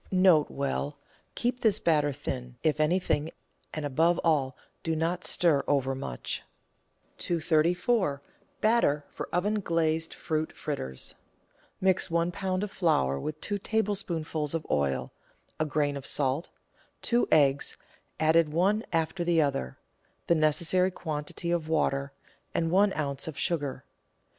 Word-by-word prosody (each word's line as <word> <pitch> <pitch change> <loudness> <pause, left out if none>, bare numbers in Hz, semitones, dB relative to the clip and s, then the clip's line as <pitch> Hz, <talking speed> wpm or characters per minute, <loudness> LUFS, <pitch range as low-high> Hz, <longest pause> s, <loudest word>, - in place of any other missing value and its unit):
N.B. 150 -6 +2 0.2
— - - -37
Keep 245 +1 -1
this 215 -3 +4
batter 150 -3 +2
thin, 125 -3 -5
if 155 -2 +2
anything, 160 -1 +1 0.4
and 155 -1 -4
above 165 +5 +2
all 140 -5 +1 0.2
do 165 -1 -1
not 170 +3 -1
stir 160 -5 +3
overmuch. 135 - -1 0.8
234— 170 - +1 0.4
BATTER 215 -10 +3
FOR - - -6
OVEN 205 +5 +1
GLAZED 165 -2 0
FRUIT 155 -1 -2
FRITTERS 65 - -5 0.7
Mix 190 0 +2
one 170 +1 +1
lb. 185 +1 -2
of 210 - -4
flour 70 - +1
with 155 - -5
two 205 -1 -2
tablespoonfuls 175 -8 -1
of 160 - -3
oil, 70 -2 0 0.5
a 155 - +2
grain 145 -1 0
of 140 -1 -5
salt, 140 +3 0 0.5
two 240 0 +2
eggs 140 -2 +3 0.4
(added 160 0 +4
one 195 +7 +2
after 165 +2 0
the 170 -1 +2
other), 135 - 0 0.5
the - - +4
necessary 165 +4 +3
quantity 155 0 -4
of 165 -2 -1
water, 140 -3 +1 0.4
and 165 -1 +1
one 195 +2 +4
oz. 140 -2 -2
of 155 - -6
sugar. 145 -6 -2
160 Hz, 130 wpm, -28 LUFS, 145-180 Hz, 0.8 s, this